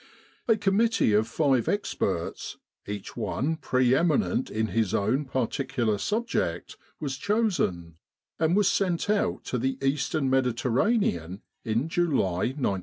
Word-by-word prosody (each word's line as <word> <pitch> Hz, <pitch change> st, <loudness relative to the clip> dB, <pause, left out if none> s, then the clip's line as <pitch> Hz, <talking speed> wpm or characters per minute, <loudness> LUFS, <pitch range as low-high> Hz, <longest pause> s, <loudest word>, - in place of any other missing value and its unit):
A 225 Hz, -2 st, +4 dB
com 200 Hz, -1 st, +1 dB
mittee 225 Hz, -, +3 dB
of 110 Hz, +1 st, +2 dB
five 130 Hz, -1 st, +1 dB
experts, 95 Hz, -, -2 dB, 0.3 s
each 100 Hz, -1 st, -6 dB
one 155 Hz, +5 st, -1 dB
pre 130 Hz, -5 st, +2 dB
eminent 190 Hz, -, +1 dB
in 110 Hz, 0 st, -1 dB
his 110 Hz, -2 st, 0 dB
own 120 Hz, +9 st, +1 dB
particular 130 Hz, -3 st, -1 dB
subject, 225 Hz, -, -2 dB, 0.2 s
was 140 Hz, -3 st, -3 dB
chosen, 160 Hz, -, 0 dB, 0.4 s
and 160 Hz, +2 st, +2 dB
was 205 Hz, -2 st, +4 dB
sent 190 Hz, 0 st, +1 dB
out 210 Hz, -, 0 dB
to 125 Hz, -, -2 dB
the 130 Hz, +3 st, -1 dB
Eastern 135 Hz, +1 st, 0 dB
Mediterranean 125 Hz, -, +1 dB, 0.2 s
in 115 Hz, +5 st, 0 dB
July, 135 Hz, -, 0 dB
1915. 100 Hz, -9 st, 0 dB
135 Hz, 130 wpm, -27 LUFS, 110-180 Hz, 0.4 s, A